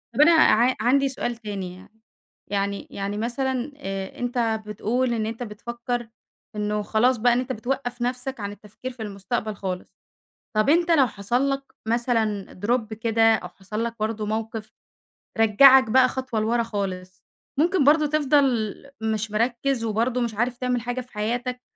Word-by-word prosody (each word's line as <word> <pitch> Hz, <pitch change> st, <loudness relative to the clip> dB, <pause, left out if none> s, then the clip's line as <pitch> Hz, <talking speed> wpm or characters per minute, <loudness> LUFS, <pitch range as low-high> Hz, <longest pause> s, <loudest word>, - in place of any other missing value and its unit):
طَب 290 Hz, -, +4 dB
أنا 325 Hz, +3 st, +8 dB
ع 255 Hz, -5 st, +5 dB
عندي 275 Hz, +3 st, +3 dB
سؤال 240 Hz, -2 st, -3 dB
تاني 200 Hz, -5 st, -6 dB
يعني 185 Hz, -, -15 dB, 0.6 s
يعني 200 Hz, 0 st, -1 dB
يعني 200 Hz, +1 st, -4 dB
مثلًا، 255 Hz, +4 st, -2 dB
آآ، 195 Hz, -7 st, -5 dB
أنت 240 Hz, -3 st, 0 dB
بتقُول 240 Hz, +4 st, 0 dB
إن 220 Hz, -2 st, -1 dB
أنت 230 Hz, +2 st, -4 dB
بتفكر 235 Hz, +2 st, -5 dB, 0.5 s
إنه 210 Hz, 0 st, -1 dB
خلاص 230 Hz, +4 st, +2 dB
بقى 240 Hz, +2 st, +4 dB
إن 245 Hz, -, +2 dB
أنت 255 Hz, +1 st, -3 dB
بتوقّف 245 Hz, +1 st, -3 dB
نفْسَك 250 Hz, +1 st, -2 dB
عن 200 Hz, 0 st, -4 dB
التفكير 210 Hz, +5 st, -9 dB
في 245 Hz, -2 st, -12 dB
المستقبل 210 Hz, +2 st, -3 dB
خالص، 185 Hz, -1 st, -5 dB, 0.6 s
طَب 215 Hz, +6 st, +3 dB
أنت 340 Hz, +2 st, +4 dB
لو 275 Hz, -6 st, +5 dB
حصل 240 Hz, +7 st, 0 dB
لك 275 Hz, 0 st, -1 dB, 0.2 s
مثلًا 225 Hz, -4 st, 0 dB
Drop 230 Hz, -2 st, 0 dB
كده 225 Hz, 0 st, +3 dB
أو -, -, -6 dB
حصل 210 Hz, +4 st, -5 dB
لك 230 Hz, 0 st, -3 dB
برضه 215 Hz, 0 st, -2 dB
موقِف 220 Hz, 0 st, -4 dB, 0.6 s
رجعك 255 Hz, +3 st, +7 dB
بقى 255 Hz, +2 st, +6 dB
خطوة 255 Hz, -4 st, -3 dB
لورا 235 Hz, +2 st, +1 dB
خالص 190 Hz, -4 st, -5 dB, 0.4 s
ممكن 350 Hz, -1 st, +3 dB
برضه 300 Hz, +2 st, +5 dB
تِفْضل 275 Hz, -7 st, +2 dB, 0.3 s
مش 220 Hz, -1 st, -1 dB
مركِّز 240 Hz, +3 st, 0 dB
وبرضه 230 Hz, +3 st, 0 dB
مش 235 Hz, -2 st, -1 dB
عارف 240 Hz, +2 st, 0 dB
تعمِل 250 Hz, -1 st, -1 dB
حاجة 245 Hz, +1 st, -3 dB
في 250 Hz, -, -16 dB
حياتك 245 Hz, +4 st, -2 dB
235 Hz, 160 wpm, -24 LUFS, 215-255 Hz, 0.6 s, أنا